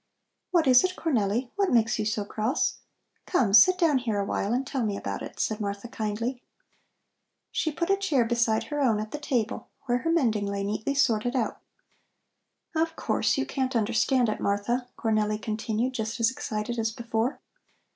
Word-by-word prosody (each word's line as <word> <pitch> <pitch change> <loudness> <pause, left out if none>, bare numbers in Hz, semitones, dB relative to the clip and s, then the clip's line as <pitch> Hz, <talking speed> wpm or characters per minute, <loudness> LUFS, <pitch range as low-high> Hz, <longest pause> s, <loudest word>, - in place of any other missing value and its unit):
"What 345 -3 +3
is 255 -2 +7
it, 370 0 0
Cornelli, 240 - 0
what 395 -2 +2
makes 230 -2 +3
you 215 - 0
so 210 -1 -1
cross? 215 +5 -1 0.5
Come, 235 - +2
sit 365 - +8
down 320 -7 +3
here 225 -5 -1
a 200 - 0
while 200 +1 -1
and 255 +3 0
tell 265 -2 -2
me 205 -2 -1
about 100 0 -4
it," - - -8
said 215 0 -1
Martha 200 +2 -4
kindly. 230 +3 -3 1.1
She 315 - 0
put 340 +4 -1
a 395 - +4
chair 305 -12 +2
beside 235 -1 +1
her 295 -1 -3
own 230 -6 +3
at 215 0 -5
the 295 - -4
table 250 -6 -2 0.2
where 245 0 +1
her 330 +6 -1
mending 225 -11 +1
lay 200 0 -2
neatly 215 +7 -2
sorted 245 -2 +2
out. 235 -4 -1 1.2
"Of 325 0 0
course, - - 0
you 270 - 0
can't 260 -1 -2
understand 235 +3 +2
it, 215 - -2
Martha," 235 +5 -1
Cornelli 215 -2 0
continued, 220 +3 -2
just 220 0 -3
as 230 +1 +3
excited 230 -1 -4
as 220 0 +1
before. 230 +2 -2
235 Hz, 180 wpm, -27 LUFS, 215-265 Hz, 1.2 s, sit